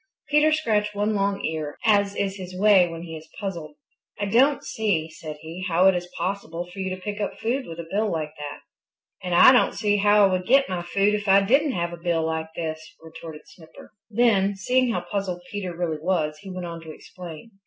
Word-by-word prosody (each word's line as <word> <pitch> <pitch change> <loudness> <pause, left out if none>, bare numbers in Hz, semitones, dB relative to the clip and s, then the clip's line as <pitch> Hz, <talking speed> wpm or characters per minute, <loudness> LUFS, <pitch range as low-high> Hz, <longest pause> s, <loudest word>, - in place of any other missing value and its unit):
Peter 300 +1 +4
scratched 210 -9 0
one 205 +2 0
long 200 -1 0
ear, 155 -2 -4
as 200 -2 +3
is 195 -1 -1
his 185 -1 -8
way 200 -3 +6
when 165 0 -7
he 165 -2 -7
is 155 0 -11
puzzled. 170 -7 -5 0.4
"I 205 - 0
don't 260 +8 +3
see," 175 -8 -1
said 155 -1 -8
he, 165 +3 -7
"how 175 +1 +3
it 190 - +7
is 175 0 -4
possible 175 -2 -3
for 180 +2 -12
you 190 0 -2
to 185 0 -5
pick 205 +2 -5
up 205 - -2
food 250 +4 -2
with 165 0 -8
a 170 - -5
bill 210 +1 0
like 155 -2 -3
that." 145 -1 -7 0.6
"And 180 -1 -1
I 215 - +9
don't 250 - +3
see 205 -1 +1
how 205 +1 +5
I 195 - +2
would 185 0 -1
get 270 +3 +5
my 180 -2 -3
food 195 +4 +1
if 210 0 -2
I 195 +1 +6
didn't 275 +7 +3
have 170 -2 -2
a - - -7
bill 170 -1 0
like 160 0 -2
this," 155 -1 -5
retorted 160 -1 -10
Snipper. 160 -2 -16 0.2
Then, 205 -3 +2
seeing 250 +5 +1
how - - -1
puzzled 190 -4 -4
Peter 185 -4 -5
really 165 -3 -2
was, 155 -3 -1
he 195 - -11
went 185 -1 -5
on 170 -1 -7
to 160 -1 -9
explain. 175 +5 -11
185 Hz, 220 wpm, -24 LUFS, 165-205 Hz, 0.6 s, I